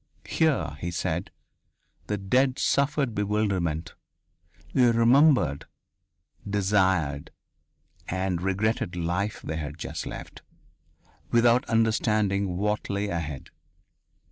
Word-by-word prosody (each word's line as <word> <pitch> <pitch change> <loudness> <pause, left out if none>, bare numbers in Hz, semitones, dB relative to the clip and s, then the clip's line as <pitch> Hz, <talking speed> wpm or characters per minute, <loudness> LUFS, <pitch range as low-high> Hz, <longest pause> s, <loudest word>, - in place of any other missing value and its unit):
Here, 135 - +1
he 85 - -2
said, 85 +1 -2 0.8
the 105 - -1
dead 125 +7 +1
suffered 140 -3 +1
bewilderment; 95 -7 -1 0.8
they 125 -2 +5
remembered, 120 - +4 0.8
desired, 95 -8 +1 0.8
and 95 -1 -1
regretted 95 0 0
the 90 - -4
life 95 +5 -2
they 80 - -4
had 75 -1 -5
just - - -5
left, - - -8 0.9
without 120 +2 +4
understanding 105 -4 +1
what 105 +2 -1
lay 100 +1 -1
ahead. 80 -6 -5
100 Hz, 95 wpm, -26 LUFS, 85-115 Hz, 0.9 s, they